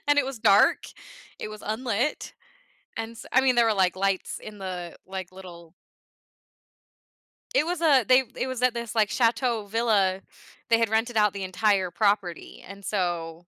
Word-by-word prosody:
and 290 Hz, 0 st, +4 dB
it 285 Hz, -, +3 dB
was 270 Hz, -2 st, -6 dB
dark, 210 Hz, -2 st, +4 dB, 0.5 s
it -, -, -5 dB
was 215 Hz, 0 st, -10 dB
unlit, 235 Hz, +4 st, -2 dB, 0.6 s
and 225 Hz, 0 st, -5 dB
s 230 Hz, -, -12 dB
I 260 Hz, -, +5 dB
mean 260 Hz, -1 st, +3 dB
there 235 Hz, -1 st, +4 dB
were, 220 Hz, -, +2 dB
like, 185 Hz, -2 st, +1 dB
lights 195 Hz, -1 st, -1 dB
in 210 Hz, -1 st, -10 dB
the, 180 Hz, -3 st, -6 dB
like, 185 Hz, -1 st, -7 dB
little 170 Hz, -3 st, -12 dB, 1.8 s
It 310 Hz, -, +3 dB
was 350 Hz, -1 st, -2 dB
a 275 Hz, -7 st, +5 dB
they 260 Hz, +1 st, +5 dB
it -, -, -2 dB
was 255 Hz, -1 st, -5 dB
at 250 Hz, -1 st, +3 dB
this 235 Hz, -1 st, -5 dB
like 215 Hz, -2 st, +2 dB
chateau 235 Hz, -2 st, +1 dB
villa. 200 Hz, -4 st, +1 dB, 0.5 s
They 230 Hz, -, +5 dB
had 230 Hz, -, +1 dB
rented 225 Hz, +2 st, 0 dB
out 210 Hz, -1 st, +3 dB
the 195 Hz, -, -4 dB
entire 190 Hz, -1 st, +1 dB
property, 200 Hz, -5 st, -1 dB
and 200 Hz, 0 st, -11 dB
so 170 Hz, -4 st, -2 dB
215 Hz, 175 wpm, -26 LUFS, 190-235 Hz, 1.8 s, I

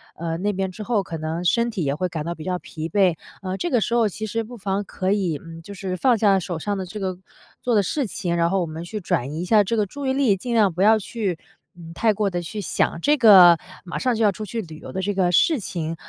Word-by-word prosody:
呃， 165 Hz, 0 st, -3 dB
那 205 Hz, +4 st, 0 dB
边 190 Hz, 0 st, -2 dB
之 210 Hz, -, -10 dB
后， 210 Hz, -3 st, 0 dB
可 165 Hz, -, -6 dB
能 160 Hz, +2 st, -3 dB
身 235 Hz, +6 st, +2 dB
体 200 Hz, -7 st, -3 dB
也 140 Hz, -1 st, 0 dB
会 185 Hz, +4 st, -1 dB
感 155 Hz, -2 st, -4 dB
到 170 Hz, -, -2 dB
比 155 Hz, -, -9 dB
较 180 Hz, +1 st, -1 dB
疲 160 Hz, +1 st, -7 dB
惫。 185 Hz, -2 st, +3 dB, 0.3 s
呃， 190 Hz, -1 st, -4 dB
这 345 Hz, -, -2 dB
个 245 Hz, -7 st, +2 dB
时 235 Hz, -, -1 dB
候 235 Hz, -2 st, +3 dB
其 215 Hz, +3 st, -5 dB
实 225 Hz, +2 st, -2 dB
不 240 Hz, +2 st, -10 dB
妨 200 Hz, -1 st, -2 dB
可 190 Hz, -1 st, -2 dB
以， 185 Hz, -7 st, 0 dB
嗯， 165 Hz, 0 st, -10 dB
就 200 Hz, +5 st, -10 dB
是 190 Hz, -1 st, -4 dB
放 250 Hz, +3 st, +3 dB
下 200 Hz, -2 st, +4 dB
手 175 Hz, -2 st, -4 dB
上 205 Hz, +3 st, -2 dB
的 190 Hz, -, -4 dB
这 180 Hz, +4 st, -7 dB
个 185 Hz, -2 st, -3 dB, 0.4 s
做 245 Hz, -2 st, +1 dB
的 205 Hz, -, +4 dB
事 275 Hz, +6 st, -1 dB
情， 175 Hz, -3 st, -2 dB
然 170 Hz, 0 st, +2 dB
后 195 Hz, +1 st, +1 dB
我 175 Hz, -, 0 dB
们 160 Hz, +1 st, -7 dB
去 210 Hz, +5 st, -5 dB
转 140 Hz, -7 st, -1 dB
移 160 Hz, -, -3 dB
一 -, -, -3 dB
下 210 Hz, +2 st, +5 dB
这 225 Hz, +4 st, -1 dB
个 210 Hz, -, +2 dB
注 280 Hz, +8 st, -7 dB
意 265 Hz, -, +1 dB
力， 265 Hz, -7 st, +3 dB
尽 240 Hz, +5 st, -4 dB
量 210 Hz, -5 st, +3 dB
不 180 Hz, -, -3 dB
要 220 Hz, +2 st, +6 dB
去， 200 Hz, -5 st, -3 dB, 0.4 s
嗯， 165 Hz, -1 st, -11 dB
太 220 Hz, +4 st, +2 dB
过 205 Hz, 0 st, 0 dB
地 175 Hz, -2 st, -3 dB
去 190 Hz, +5 st, -6 dB
想 165 Hz, -, 0 dB
这 295 Hz, +7 st, +3 dB
个 190 Hz, -8 st, +8 dB, 0.3 s
马 175 Hz, -2 st, -5 dB
上 250 Hz, -3 st, 0 dB
就 225 Hz, -, 0 dB
要 205 Hz, -, +5 dB
出 215 Hz, +3 st, -7 dB
去 225 Hz, +2 st, -4 dB
旅 160 Hz, -6 st, -10 dB
游 -, -, -10 dB
的 190 Hz, -, -3 dB
这 205 Hz, +2 st, -1 dB
个 185 Hz, -2 st, +1 dB
事 295 Hz, -, +3 dB
情。 165 Hz, -4 st, -4 dB
195 Hz, 305 characters per minute, -23 LUFS, 170-220 Hz, 0.4 s, 个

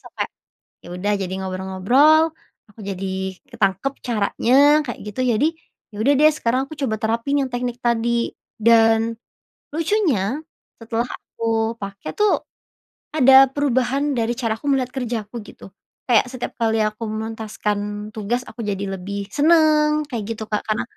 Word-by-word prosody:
sampai, -, -, -4 dB, 0.6 s
ya -, -, -10 dB
udah 190 Hz, +4 st, -1 dB
jadi 190 Hz, -2 st, -4 dB
ngobrol-ngobrol 190 Hz, -, +3 dB, 0.4 s
aku 210 Hz, -, -20 dB
jadi 195 Hz, -1 st, -4 dB, 0.4 s
ketangkep 215 Hz, +4 st, 0 dB
caranya 230 Hz, +1 st, 0 dB, 0.3 s
kayak 240 Hz, -5 st, -6 dB
gitu 210 Hz, +3 st, -7 dB
jadi, 240 Hz, +2 st, +2 dB, 0.5 s
ya -, -, -13 dB
udah 275 Hz, +6 st, +4 dB
deh 305 Hz, +1 st, +7 dB
sekarang 240 Hz, +3 st, +1 dB
aku -, -, -7 dB
coba 265 Hz, -6 st, -1 dB
terapin 230 Hz, +5 st, 0 dB
yang 265 Hz, -, -2 dB
teknik 245 Hz, 0 st, -4 dB
tadi 235 Hz, 0 st, +1 dB, 0.3 s
dan, 225 Hz, 0 st, +4 dB, 0.6 s
lucunya 310 Hz, -, +1 dB, 0.4 s
setelah 230 Hz, +1 st, -2 dB
aku 225 Hz, 0 st, -2 dB
pake 195 Hz, 0 st, -8 dB
tuh, 420 Hz, 0 st, +1 dB, 0.7 s
ada 270 Hz, -1 st, +8 dB
perubahan 275 Hz, +1 st, 0 dB
dari 235 Hz, -2 st, 0 dB
cara 230 Hz, -4 st, 0 dB
aku 225 Hz, -, -14 dB
melihat 255 Hz, -2 st, 0 dB
kerjaku 235 Hz, -4 st, -4 dB
gitu, -, -, -13 dB, 0.4 s
kayak 240 Hz, -4 st, +4 dB
setiap 255 Hz, -2 st, -5 dB
kali 225 Hz, -1 st, +2 dB
aku 215 Hz, +2 st, -4 dB
menuntaskan 210 Hz, -1 st, -3 dB
tugas 225 Hz, +3 st, -1 dB
aku 240 Hz, -, -8 dB
jadi 200 Hz, -1 st, -2 dB
lebih 200 Hz, +2 st, -5 dB
seneng 305 Hz, -1 st, +4 dB
kayak 235 Hz, -6 st, -3 dB
gitu 220 Hz, -, -6 dB
Kak 210 Hz, -, 0 dB
karena 215 Hz, -1 st, 0 dB
230 Hz, 145 wpm, -21 LUFS, 210-265 Hz, 0.7 s, ada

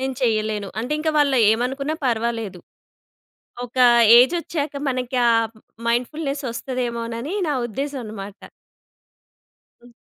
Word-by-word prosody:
నేను 265 Hz, 0 st, -2 dB
చెయ్యలేను" 215 Hz, -3 st, 0 dB
అంటే, 250 Hz, +6 st, -3 dB
ఇంకా 315 Hz, 0 st, 0 dB
వాళ్ళు 280 Hz, -3 st, +3 dB
ఏమనుకున్నా 270 Hz, +6 st, -2 dB
పర్వాలేదు. 225 Hz, -5 st, -2 dB, 1.1 s
ఒక 245 Hz, +1 st, -13 dB, 0.4 s
ఏజొచ్చాక 305 Hz, +1 st, 0 dB, 0.2 s
మనకి 255 Hz, 0 st, -2 dB
ఆ -, -, +5 dB, 0.6 s
మైండ్‌ఫుల్‌నెస్ 275 Hz, +4 st, -2 dB
ఒస్తదేమోనని 235 Hz, -, -4 dB
నా 290 Hz, -, 0 dB
ఉద్దేశం 275 Hz, +4 st, -4 dB
అన్నమాట. 205 Hz, -1 st, -9 dB, 1.4 s
హ్మ్. 245 Hz, 0 st, -18 dB
250 Hz, 100 wpm, -22 LUFS, 230-280 Hz, 1.4 s, ఆ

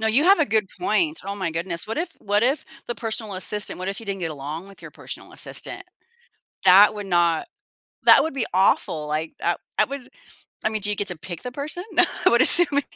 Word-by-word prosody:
no, 220 Hz, -, -1 dB
you 255 Hz, +8 st, +2 dB
have 390 Hz, 0 st, +5 dB
a 310 Hz, -, +3 dB
good 215 Hz, -3 st, 0 dB
point. 330 Hz, -3 st, 0 dB
Oh, 200 Hz, 0 st, -5 dB
my 185 Hz, -4 st, -4 dB
goodness. 170 Hz, +2 st, -4 dB
What 225 Hz, -, -5 dB
if 340 Hz, 0 st, -3 dB
what 205 Hz, +2 st, 0 dB
if 270 Hz, +5 st, 0 dB, 0.2 s
the 240 Hz, -, -4 dB
personal 220 Hz, -3 st, -4 dB
assistant 205 Hz, +2 st, 0 dB
what 185 Hz, +1 st, -5 dB
if 200 Hz, -, -5 dB
you -, -, -11 dB
didn't 195 Hz, -1 st, -5 dB
get 165 Hz, -2 st, -3 dB
along 150 Hz, +5 st, -7 dB
with 195 Hz, -, -15 dB
your -, -, -10 dB
personal -, -, -10 dB
assistant? -, -, -5 dB, 0.8 s
That 195 Hz, +3 st, +6 dB
would 205 Hz, -, -7 dB
not 170 Hz, -3 st, +1 dB, 0.6 s
that -, -, +7 dB
would 320 Hz, -, -3 dB
be 260 Hz, -, -2 dB
awful. 165 Hz, -5 st, +1 dB
Like, 155 Hz, +2 st, -4 dB
I 170 Hz, 0 st, 0 dB, 0.2 s
I -, -, +5 dB
wouldn't 275 Hz, -2 st, -9 dB, 0.6 s
I -, -, +2 dB
mean, 215 Hz, -1 st, -4 dB
do 205 Hz, -, +5 dB
you 210 Hz, -, -1 dB
get 205 Hz, -, -3 dB
to 175 Hz, -, -6 dB
pick 170 Hz, 0 st, -8 dB
the 250 Hz, -, -6 dB
person? 305 Hz, +6 st, -5 dB, 0.4 s
I -, -, +7 dB
would -, -, +4 dB
assuming 290 Hz, -5 st, +8 dB
205 Hz, 225 wpm, -22 LUFS, 175-250 Hz, 0.8 s, assuming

